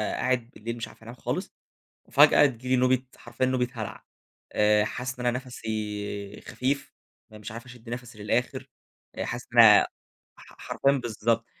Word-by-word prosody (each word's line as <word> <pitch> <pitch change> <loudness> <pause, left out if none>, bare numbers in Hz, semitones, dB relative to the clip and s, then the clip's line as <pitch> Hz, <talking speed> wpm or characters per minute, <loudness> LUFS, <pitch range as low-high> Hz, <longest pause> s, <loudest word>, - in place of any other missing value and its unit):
قاعد 125 -2 0
بالليل 115 +2 -6
مش 115 - -4
عارف - - -17
أنام 115 +2 -9
خالص، - - -3 0.6
وفجأة 145 - +7
تيجي 125 -2 -3
لي 130 - +4
نوبة 130 0 +3
حرفيًا 120 +2 -2
نوبة 130 -1 +1
هَلَع. 110 -5 -6 0.5
آآ 105 0 +4
حاسس 125 +3 -5
إن 125 - -4
أنا 120 0 +2
نَفَسي 105 -5 -5
خفيف، 140 +2 -2 0.4
أنا 110 - -11
مش 105 0 -8
عارف 115 +2 -8
أشد 120 -2 -13
نَفَسي 120 -1 -7
للآخر، 130 +4 -1 0.5
آآ - - -3
حاسس - - -5
إن - - +4
انا - - +9 0.5
ح - - -16
ح - - -18
حرفيًا 140 - +1
بالضبط، 115 -3 0
120 Hz, 170 wpm, -27 LUFS, 110-130 Hz, 0.6 s, انا